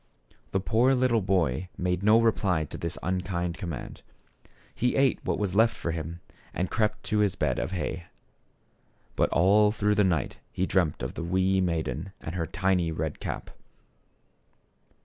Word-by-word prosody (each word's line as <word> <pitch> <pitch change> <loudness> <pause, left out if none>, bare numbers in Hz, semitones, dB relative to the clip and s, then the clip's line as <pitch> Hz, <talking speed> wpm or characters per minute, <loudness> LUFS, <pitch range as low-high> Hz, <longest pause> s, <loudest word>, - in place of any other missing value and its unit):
The 95 - 0
poor 120 +7 +3
little 125 -3 +2
boy 90 -4 0
made 90 0 -1
no 105 +3 +5
reply 100 -8 +2
to - - -8
this 85 - -3
un 90 0 0
kind 90 -2 -2
command. 85 -9 -6 0.7
He 125 +1 0
ate 135 -1 +2
what - - -1
was 100 -3 -1
left 115 +3 +4
for 85 - -3
him 85 +1 -5 0.3
and 90 +1 -1
crept 105 -1 0
to 105 - 0
his 105 -2 +2
bed - - 0
of - - -2
hay. 90 -1 -3 1.1
But - - +2
all 105 +5 +4
through 105 -1 +1
the 105 0 +3
night 85 -8 0
he 95 - -1
dreamed 90 -6 0
of - - -3
the - - -5
w 85 +2 -4
r - - +3 0.2
ee - - +3
maiden 85 0 -2
and 80 - -6
her 85 -3 -2
tiny 95 -1 +1
red 80 -1 -3
cap. - - -5
95 Hz, 175 wpm, -27 LUFS, 85-105 Hz, 1.1 s, no